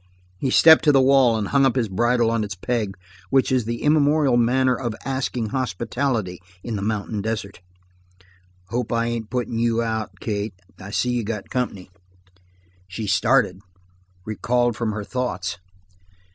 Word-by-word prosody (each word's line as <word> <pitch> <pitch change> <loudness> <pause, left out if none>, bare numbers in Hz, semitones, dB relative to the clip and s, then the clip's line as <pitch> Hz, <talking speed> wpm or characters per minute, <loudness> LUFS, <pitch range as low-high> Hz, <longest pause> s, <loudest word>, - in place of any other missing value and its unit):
He 130 - -1
stepped 160 +4 +7
to 150 - +6
the 135 - +5
wall 130 -3 +4
and 105 -2 -3
hung 140 -1 +3
up 130 -2 +3
his 120 -4 +1
bridle 120 +4 +1
on 115 -1 0
its 100 -2 -5
peg, 105 0 -2 0.3
which 135 -1 +2
is 125 -3 +1
the 115 +1 -4
immemorial 150 -2 +3
manner 125 +2 +3
of 120 -4 -4
asking 130 -4 -2
hospitality 120 -4 -2 0.2
in 115 - -4
the 100 - -3
mountain 105 0 -2
desert. 100 -3 -4 1.1
"Hope 120 +1 -2
I 115 0 +1
ain't 115 -2 -3
puttin' 120 -2 -2
you 115 0 +1
out, 110 -4 -4
Kate. 105 -2 -3 0.2
I 95 - -9
see 125 +4 0
you 120 -1 -1
got 105 -2 -5
company." 100 -8 -3 1.0
She 100 +4 -5
started, 95 0 +2 0.7
recalled 120 +2 0
from 115 -2 -2
her 105 -1 -4
thoughts. 95 -8 -3
115 Hz, 160 wpm, -22 LUFS, 105-125 Hz, 1.1 s, stepped